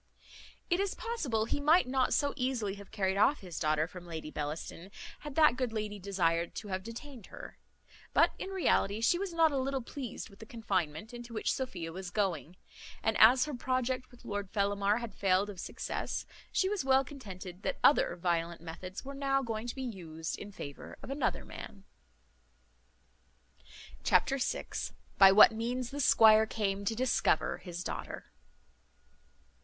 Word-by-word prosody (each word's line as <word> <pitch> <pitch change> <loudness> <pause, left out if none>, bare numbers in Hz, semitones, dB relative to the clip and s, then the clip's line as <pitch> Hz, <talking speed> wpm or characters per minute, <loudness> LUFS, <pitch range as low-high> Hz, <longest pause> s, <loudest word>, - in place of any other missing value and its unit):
It 350 - +3
is 395 -1 0
possible 285 - -1
he 260 - -2
might 305 +1 +4
not 260 0 +1
so 285 -1 +2
easily 250 -6 -1
have 200 0 -11
carried 195 -2 0
off 270 +8 +4
his 180 -3 -6
daughter 155 0 +2
from 175 +1 -11
Lady 160 -2 -6
Bellaston, 155 +4 -5 0.3
had 295 -3 -8
that 305 -6 +6
good 255 -2 -1
lady 210 -2 -4
desired 175 -3 0
to 210 - -6
have 185 0 -2
detained 230 +2 -9
her; - - -11 0.5
but, - - +4
in - - -4
reality, 265 - +1
she 295 +10 +3
was 395 -2 -3
not 330 -2 +4
a 275 - 0
little 270 -1 -1
pleased 250 -1 -6
with 200 - -17
the 220 - -11
confinement 195 -3 -2
into 240 -1 -8
which 215 - 0
Sophia 190 -12 -4
was 185 0 -6
going; 180 -4 -1 0.5
and 220 - +1
as 250 +4 +7
her 300 - -5
project 255 0 -1
with 245 -1 -18
Lord 205 -1 -3
Fellamar 200 0 +1
had 235 -4 -5
failed 195 +2 +2
of 190 - -11
success, - - -4 0.3
she 380 - +2
was 405 -4 -1
well 265 0 +4
contented 195 - -9
that - - -2
other 280 - +5
violent 170 -1 -1
methods 180 +6 -8
were 275 - -6
now 275 -1 +1
going 225 -1 -3
to 240 - -4
be 265 - -4
used 165 -9 -5
in 205 - -8
favour 145 -7 -9
of - - -7
another 280 +1 -1
man. 195 -2 -10 2.2
Chapter 275 0 +3
vi. - - -1 0.5
By 195 -1 +10
what 210 +3 +9
means 240 +2 -3
the 285 - -5
squire 220 -4 +6
came 200 -2 -2
to 225 - 0
discover 255 +2 +1
his 180 -1 -6
daughter. - - -6
220 Hz, 170 wpm, -32 LUFS, 190-260 Hz, 2.2 s, By